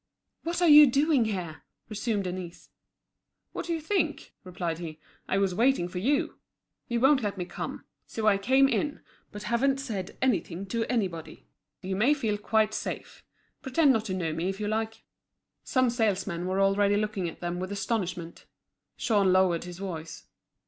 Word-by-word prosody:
"What 340 +2 -2
are - - +5
you 300 -1 +10
doing 275 -1 +3
here?" 180 -7 -4 0.3
resumed 215 -1 -2
Denise. 180 -1 -7 0.8
"What - - -5
do 340 - 0
you - - -3
think?" 315 -3 -1
replied 175 -3 -4
he. 160 -3 -7 0.3
"I 190 - +2
was 195 -2 +1
waiting 230 -2 +2
for 180 0 -5
you. 280 +9 0 0.5
You 235 -1 0
won't 270 +2 +5
let 205 -2 -2
me 180 - -3
come. - - -6 0.2
So 220 - -4
I 200 -2 +4
came 265 +7 +4
in, 290 +1 -1 0.3
but 205 0 -8
haven't 245 +6 +1
said 215 -9 -5
anything 200 -7 0
to 230 +1 -1
anybody. 190 -10 -3 0.4
You 190 +1 -2
may 240 +10 +3
feel 215 -7 -1
quite 215 0 +1
safe. - - -5 0.4
Pretend 275 +1 +3
not 220 -2 0
to 190 -4 -2
know 165 -4 -2
me, 165 +4 -1
if 195 +1 -5
you 210 - -2
like." 220 +1 -2 0.6
Some 255 -3 +2
salesmen 195 -6 -1
were 190 +1 0
already 200 +1 +3
looking 210 -4 -1
at - - -12
them 175 0 -3
with 185 +2 -4
astonishment. 185 -5 -3 0.5
Jean 200 -4 +2
lowered 185 -2 +3
his 175 -1 -8
voice. 165 -5 -6
205 Hz, 170 wpm, -28 LUFS, 185-245 Hz, 0.8 s, you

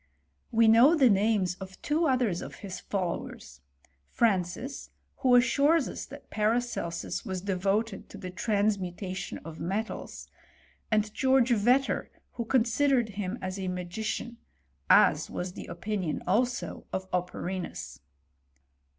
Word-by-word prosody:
We 230 0 +4
know 235 +9 +7
the 265 -7 +5
names 200 -2 +2
of 190 -1 -10
two 315 +2 +1
others 245 -10 +1
of - - -8
his 185 -1 -6
followers; 170 - -4 0.5
Francis, 220 +4 0 0.3
who 255 -2 +4
assures 280 +5 +4
us - - -6
that - - -12
Paracelsus 215 -6 -1
was 190 -5 -4
devoted 200 +3 -1
to - - -10
the 185 -2 -7
trans 205 +1 +1
mutation 185 +1 -5
of 160 -1 -8
metals; 205 +6 -4 0.6
and 215 -1 +1
George 260 -2 +3
Vetter, 245 +5 +2 0.2
who 235 - -4
con 250 0 +3
sidered 250 -1 +2
him 200 +1 -4
as 185 +1 -4
a 190 - -3
magician; 185 +6 -4 0.5
as - - +5
was 180 0 -4
the - - -8
opinion 185 -2 -3
also 240 +6 -1
of 190 0 -3
Operinus. 180 - -4
210 Hz, 130 wpm, -29 LUFS, 185-240 Hz, 0.6 s, know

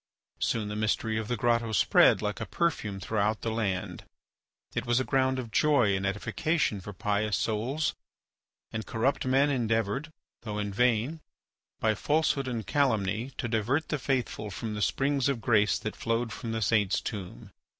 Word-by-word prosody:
Soon 110 -2 0
the 105 - -4
mystery 110 +1 0
of 110 - -4
the 120 - -1
grotto 115 0 +1
spread 110 - +5
like 105 -1 -2
a - - -3
perfume 110 -13 -1
throughout 105 +1 0
the 115 - -2
land; 100 -5 -2 0.7
it - - -1
was 120 +1 +2
a - - +1
ground 130 0 +1
of 120 -3 -5
joy 125 -10 +3
and 95 0 -1
edification 110 - 0
for 105 - -7
pious 105 +1 0
souls, 125 +8 -1 0.8
and 110 0 -4
corrupt 120 +6 0
men 135 +3 +3
endeavoured, 115 +3 0 0.3
though 105 -3 -5
in 105 -1 -2
vain, 125 +7 +1 0.6
by 110 -1 +2
falsehood 145 +3 +1
and 115 -4 -3
calumny, 110 -4 +1
to 120 - -2
divert 120 +7 0
the 150 - -1
faithful 125 -5 -1
from 105 +4 -5
the 105 - -4
springs 135 +4 +1
of 135 -4 -1
grace 105 -3 +3
that 110 - -5
flowed 115 0 -1
from 115 - -5
the 110 -1 -1
saint's 105 -3 +2
tomb. 90 - -7
115 Hz, 170 wpm, -29 LUFS, 105-130 Hz, 0.8 s, spread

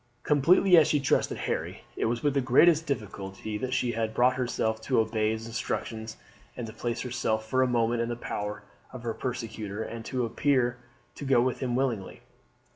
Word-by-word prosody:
Completely 170 +5 +5
as 155 -2 +6
she 150 -2 +2
trusted 135 - +1
Harry, - - -3
it - - -1
was 115 +1 -1
with 145 -2 +2
the 140 - +2
greatest 155 +6 +5
difficulty 105 -5 -4
that 130 +2 -3
she 125 -2 +1
had 110 -1 -2
brought 125 +1 +4
herself 110 -3 -1
to 125 +2 +1
obey 110 -1 +1
his 110 0 -3
instructions 110 -1 -4 0.4
and 120 - -4
to 110 - -8
place 120 +1 -3
herself 115 -3 -1
for 130 +3 +2
a 130 - +4
moment 120 -1 +1
in 115 - -1
the 120 - -2
power 105 -2 -5 0.3
of 130 -2 -9
her 115 -1 -2
persecutor, 110 -4 -4
and 115 0 -7
appear 125 0 +1 0.4
to - - -9
go 135 -3 +4
with 125 +1 +1
him 125 -2 -1
willingly. 125 -7 -2
120 Hz, 190 wpm, -28 LUFS, 110-130 Hz, 0.4 s, as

